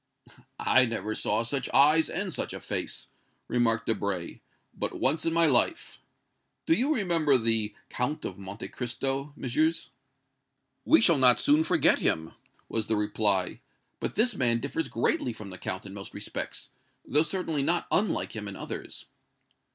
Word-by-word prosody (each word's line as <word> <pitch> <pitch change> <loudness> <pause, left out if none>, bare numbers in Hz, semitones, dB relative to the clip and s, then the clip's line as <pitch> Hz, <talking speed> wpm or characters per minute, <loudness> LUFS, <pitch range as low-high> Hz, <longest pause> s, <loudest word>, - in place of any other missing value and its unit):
"I 130 -1 +4
never 110 -2 -3
saw 110 +1 0
such 130 +2 -3
eyes 150 +4 +5
and 190 -1 -3
such - - -3
a - - -6
face," - - -3 0.4
remarked 115 -2 +1
Debray, 100 -5 -3 0.4
"but - - -4
once 150 +5 +2
in - - +2
my 165 0 +5
life. 150 - +2 0.7
Do 325 - +3
you 285 -1 +1
remember 165 - +2
the 115 -2 +1
Count 135 +5 -3
of - - -6
Monte 100 +3 -7
Cristo, 135 +3 -3
Messieurs?" 155 +5 -1 0.9
"We 320 - +5
shall 170 -9 +5
not 125 -2 +5
soon 150 +2 +4
forget - - +3
him," 80 +1 +1 0.4
was 110 -1 -2
the 110 - +1
reply. 105 -3 0 0.4
"But - - -4
this 235 +4 +2
man 120 -2 +2
differs 140 +5 -3
greatly 120 +1 -1
from 105 -3 -10
the 90 - -8
Count 95 +2 -4
in 95 - -9
most 100 -1 -9
respects, - - -5 0.4
though 150 - +3
certainly 160 -2 -1
not 170 +5 0
unlike 210 - +1
him 105 -1 -5
in 100 - -6
others." - - -7
125 Hz, 160 wpm, -28 LUFS, 110-160 Hz, 0.9 s, eyes